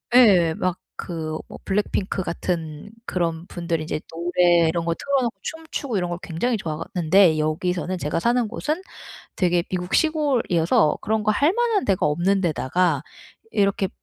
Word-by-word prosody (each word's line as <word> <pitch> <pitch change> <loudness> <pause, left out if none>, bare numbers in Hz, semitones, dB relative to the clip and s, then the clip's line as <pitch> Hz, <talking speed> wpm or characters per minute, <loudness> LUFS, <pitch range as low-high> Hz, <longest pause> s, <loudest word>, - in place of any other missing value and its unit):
예 190 -10 +6
막 180 0 -1 0.2
그 160 -2 -4
뭐 - - -10
블랙핑크 195 -1 -1
같은 170 0 -4 0.2
그런 170 -1 -2
분들이 170 -2 -3
이제 155 0 -3
노래 175 0 +3
이런 165 +1 -1
거 170 - +1
틀어놓고 255 +1 -1
춤추고 320 -7 -4
이런 175 -2 -1
걸 175 - -4
굉장히 220 +9 -1
좋아하는데 170 0 +2
여기서는 180 +4 -1
제가 150 -2 -1
사는 240 +4 +1
곳은 305 - -3 0.5
되게 175 -2 +2
미국 180 -1 -4
시골이어서 250 - +2
그런 220 0 0
거 215 - +2
할 285 +10 +3
만한 465 - +1
데가 190 -8 +1
없는 175 +6 +1
데다가 165 -2 +1 0.5
이렇게 200 -1 +1
180 Hz, 320 characters per minute, -23 LUFS, 165-215 Hz, 0.5 s, 예